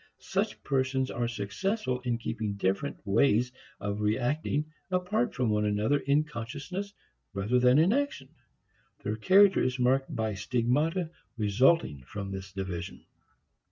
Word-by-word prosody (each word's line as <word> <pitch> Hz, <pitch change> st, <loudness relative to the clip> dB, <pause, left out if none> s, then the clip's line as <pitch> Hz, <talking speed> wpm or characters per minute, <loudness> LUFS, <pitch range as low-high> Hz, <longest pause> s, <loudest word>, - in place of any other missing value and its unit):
Such -, -, -2 dB
persons 130 Hz, -1 st, 0 dB
are 120 Hz, -1 st, -1 dB
successful 125 Hz, -, -2 dB
in 120 Hz, -2 st, -1 dB
keeping 110 Hz, -2 st, -3 dB
different 100 Hz, +7 st, -1 dB
ways 120 Hz, +4 st, +3 dB, 0.3 s
of 105 Hz, +1 st, -3 dB
reacting 130 Hz, +8 st, 0 dB, 0.2 s
apart 180 Hz, -9 st, 0 dB
from 125 Hz, -4 st, +1 dB
one 105 Hz, 0 st, +1 dB
another 105 Hz, +7 st, +1 dB
in 140 Hz, +2 st, +2 dB
consciousness 150 Hz, -, -6 dB, 0.4 s
rather 105 Hz, +6 st, +1 dB
than 125 Hz, +2 st, +5 dB
in 170 Hz, +7 st, +5 dB
action. 275 Hz, -, -1 dB, 0.7 s
Their 105 Hz, -, -1 dB
character 190 Hz, -, +5 dB
is 130 Hz, 0 st, 0 dB
marked 130 Hz, +2 st, +1 dB
by 110 Hz, -1 st, -1 dB
stigmata 130 Hz, -, 0 dB, 0.3 s
resulting 105 Hz, -, +3 dB
from 100 Hz, +1 st, -5 dB
this 95 Hz, 0 st, -6 dB
division. 95 Hz, -3 st, -5 dB
125 Hz, 130 wpm, -29 LUFS, 105-145 Hz, 0.7 s, than